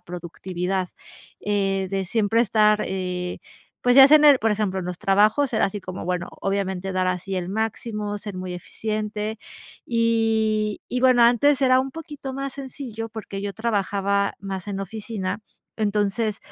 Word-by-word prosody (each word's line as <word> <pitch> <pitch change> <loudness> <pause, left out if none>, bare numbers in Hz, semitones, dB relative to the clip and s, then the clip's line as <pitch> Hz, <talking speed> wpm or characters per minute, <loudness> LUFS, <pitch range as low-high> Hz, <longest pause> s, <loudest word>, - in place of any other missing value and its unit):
productividad, 180 +1 -4 0.5
eh, 195 -2 0
de 195 -1 -1
siempre 220 +3 +1
estar, 215 -1 +3
eh, 180 -1 -3 0.4
pues, 245 +1 +4
ya 270 0 +11
sea 305 +2 +8
en 300 - +3
el, 285 -3 +8
por 220 -1 +2
ejemplo, 200 -3 -1
en 180 - -4
los 180 -1 -5
trabajos 215 +7 +3
era 220 - +2
así 200 +1 -3
como 185 0 -7
bueno, 180 0 -2
obviamente 195 -1 -2
dar 185 0 +1
así 185 +1 -3
el 180 -1 -2
máximo, 210 0 -3
ser 205 -2 -7
muy 185 -1 -5
eficiente, 215 +3 -4 0.5
y 225 -2 +1
y 250 - -2
bueno, 255 -2 +5
antes 255 +4 +4
era 255 -1 +5
un 270 +1 -4
poquito 295 -3 -7
más 275 0 -4
sencillo, 255 -5 -6
porque 215 -3 -7
yo 200 -1 -3
trabajaba 200 -2 0
más 195 0 -6
en 200 - -3
la 195 - -3
oficina, 210 -1 -4 0.4
entonces, 210 0 0
210 Hz, 165 wpm, -23 LUFS, 190-230 Hz, 0.5 s, ya